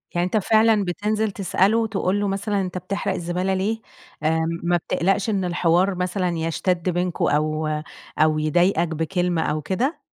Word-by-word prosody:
يعني 175 0 +2
أنت 185 +4 0
فعلًا 215 0 +3
بتنزل 210 +4 -1
تسأله، 205 +3 +1
تقُول 195 -1 0
له 205 - 0
مثلًا 200 +1 -1
"أنت 185 -1 -4
بتحرق 195 +2 -2
الزبالة 180 +2 -1
ليه؟" 215 +4 -1 0.4
آآ 160 +1 +2 0.2
ما 175 0 +2
بتقلقش 195 +5 0
إن 195 -3 0
الحوار 180 +2 +2
مثلًا 180 0 -1
يشتد 170 +2 -1
بينكم 180 0 -1
أو 155 +1 0 0.5
أو 155 0 +3
يضايقك 170 +3 +2
بكلمة 165 +1 -1
أو 155 -1 -1
كده؟ 245 - -1
185 Hz, 155 wpm, -23 LUFS, 170-200 Hz, 0.5 s, فعلًا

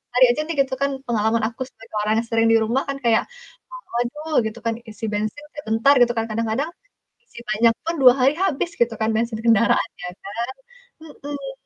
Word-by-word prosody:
tadi 255 - +7
aja 275 - -1
nih 335 - -3
gitu 265 -1 -8
kan 280 - +2 0.2
pengalaman 225 -1 +1
aku 230 +2 -10
sebagai 225 -3 -14
orang 215 - +1
yang 230 - -4
sering 225 0 +2
di 225 - +6
rumah 240 +5 0
kan 275 - -2
kayak, 230 -1 +3 0.5
mmm, - - -11
waduh 295 +7 -3
gitu 220 +2 -5
kan 230 - +1 0.2
isi 220 - -9
bensin 215 +8 -3
sebentar 225 0 +2
gitu 240 0 +5
kan 225 - 0
kadang-kadang, 230 +7 -1 0.6
isi 470 - -13
banyak 225 +2 +4
pun 335 +1 -1
2 250 -1 +9
hari 265 +3 +4
habis 335 -2 0
gitu 235 -1 +2
kan 220 - +2
bensin 230 -1 -1
kendaraan 230 -1 +3
ya - - -4 0.2
kan. 200 - -8 0.7
Mhm. 285 -2 -7
235 Hz, 195 wpm, -22 LUFS, 225-275 Hz, 0.7 s, 2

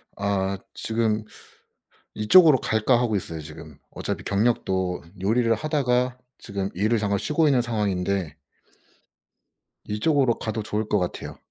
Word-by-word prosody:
아 100 -1 -1 0.2
지금 110 -1 -1 0.9
'이쪽으로 150 +7 +6
갈까.' 110 +2 +2
하고 115 -4 +1
있어요 85 -4 -4
지금. 75 -1 -11
어차피 - - -5
경력도 95 -4 0 0.2
요리를 115 +4 +2
하다가 125 -3 0 0.2
지금 100 -1 -4
일을 110 +5 +1
잠깐 100 -1 0
쉬고 155 - +1
있는 130 -5 +3
상황인데 100 -7 -1 1.5
이쪽으로 130 +3 +2
가도 110 0 -4
좋을 105 0 -2
것 105 - +2
같아요. 90 - -4
105 Hz, 280 characters per minute, -24 LUFS, 100-120 Hz, 1.5 s, 이쪽으로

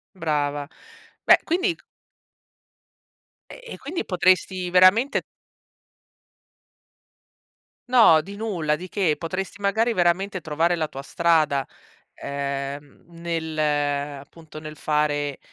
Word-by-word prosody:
Brava. 145 -3 -2 0.6
Beh - - +7
quindi 360 +1 0
c - - -25 1.7
E - - -11
e - - -9
quindi 330 +6 -4
potresti 185 0 +1
veramente 185 +9 +4 2.7
No, 225 -11 +6
di 200 +5 -9
nulla, 175 -9 -1
di 185 +3 -9
che. 180 -6 0
Potresti 190 +4 -5
magari 220 +4 +1
veramente 185 +1 +1
trovare 165 +2 0
la 160 -1 -1
tua 135 -2 -9
strada, 155 -3 +1 0.5
ehm, 140 0 -5
nel 165 -2 -5
appunto, 145 +1 -2
nel 155 0 -9
fare, 145 -2 -1
165 Hz, 100 wpm, -23 LUFS, 145-185 Hz, 2.7 s, Beh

